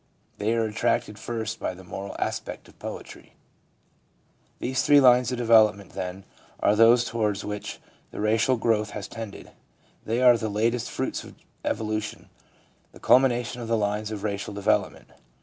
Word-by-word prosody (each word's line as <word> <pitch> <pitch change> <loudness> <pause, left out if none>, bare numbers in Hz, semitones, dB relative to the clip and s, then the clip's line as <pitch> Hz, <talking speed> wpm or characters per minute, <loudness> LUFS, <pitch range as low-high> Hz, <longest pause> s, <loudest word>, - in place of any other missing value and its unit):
They 110 +3 +1
are 115 - +1
attracted 105 -1 -1
first 115 -1 -4
by 90 - -3
the 95 - -13
moral 95 +2 -7
aspect - - -4
of - - -20
poetry. - - -9 1.2
These 130 +1 -1
three 145 0 +6
lines 125 -2 +5
of 125 - -2
development, 110 -4 +4
then, 95 0 -5 0.4
are 105 - +3
those 115 +2 +6
toward 105 -4 -1
which 105 0 -5 0.3
racial 110 +4 +1
growth 110 -2 +1
has 100 - -6
tended; 115 -3 -8 0.5
they 115 +2 -1
are 125 -2 +6
the 110 - -2
latest 115 +3 0
fruits - - -3
of - - -13 0.3
evolution, 110 -1 -3 0.6
the - - -14
culmination 125 -2 +3
of 115 - -5
the 115 0 +1
lines 105 0 -1
of 105 -2 -6
racial 100 -1 -3
development. 100 -1 0
110 Hz, 150 wpm, -26 LUFS, 105-120 Hz, 1.2 s, three